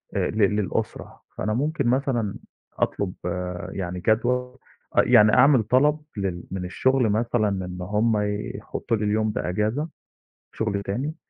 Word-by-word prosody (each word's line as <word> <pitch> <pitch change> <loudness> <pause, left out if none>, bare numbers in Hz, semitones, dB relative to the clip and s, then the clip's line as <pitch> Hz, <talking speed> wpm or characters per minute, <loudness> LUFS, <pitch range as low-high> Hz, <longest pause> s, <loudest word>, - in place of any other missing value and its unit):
آآ، - - +1
ل 110 - -5
للأُسرة، 105 -2 -1 0.2
فأنا 105 - -1
ممكن 140 +2 0
مثلًا 125 -5 0 0.4
أطلُب 95 -3 -1 0.6
يعني 90 -2 -4
جدول، 125 +5 0 0.4
آه - - +9
يعني 105 0 +6
أعمل 130 -2 +6
طلب 140 +7 +3 0.2
لل 95 -3 -2
من 95 -1 -3
الشُغل 130 +6 +2
مثلًا 110 0 +1 0.2
إن 90 0 -7
هُم 105 +4 +1 0.4
يحطّوا 115 - -3
لي 105 - -2
اليوم 110 +1 +1
ده 95 - -3
أجازة 110 - -1 0.6
شُغل 100 -3 -2
تاني، 130 +11 -3
110 Hz, 140 wpm, -24 LUFS, 100-125 Hz, 0.6 s, آه